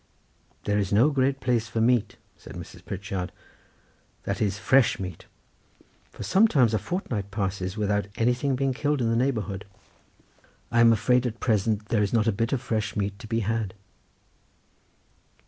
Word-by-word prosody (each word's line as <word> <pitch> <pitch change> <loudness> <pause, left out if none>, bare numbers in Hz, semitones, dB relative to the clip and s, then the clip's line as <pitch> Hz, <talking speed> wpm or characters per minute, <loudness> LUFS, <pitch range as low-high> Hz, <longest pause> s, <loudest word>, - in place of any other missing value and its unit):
"This 105 -1 +1
is - - -11
no 120 +9 +5
great 135 0 +1
place 120 -3 0
for 105 +2 -3
meat," 115 -2 +2 0.2
said - - -12
Mrs. - - -10
Pritchard, 95 -1 -4 0.9
"that - - -3
is 100 -2 0
fresh 130 +4 +3
meat, 90 -4 -7 0.8
for - - -9
sometimes 150 - +4
a 110 - +2
fortnight 120 - -3
passes 95 -1 -3
without 105 -1 0
anything 125 +4 +1
being 135 0 0
killed 145 +2 0
in 115 -2 +1
the - - +2
neighbourhood. 110 -6 -1 1.1
I 115 - +2
am 115 0 +7
afraid 125 +3 +3
at 115 -1 -6
present 110 -2 0
there 115 -3 +2
is 100 +1 0
not 110 -2 +3
a 115 - +3
bit 115 +3 -1
of 135 - +1
fresh 110 -2 -2
meat 100 -1 -2
to 110 - -9
be 115 +1 0
had. 110 -1 -2
110 Hz, 165 wpm, -26 LUFS, 100-125 Hz, 1.1 s, am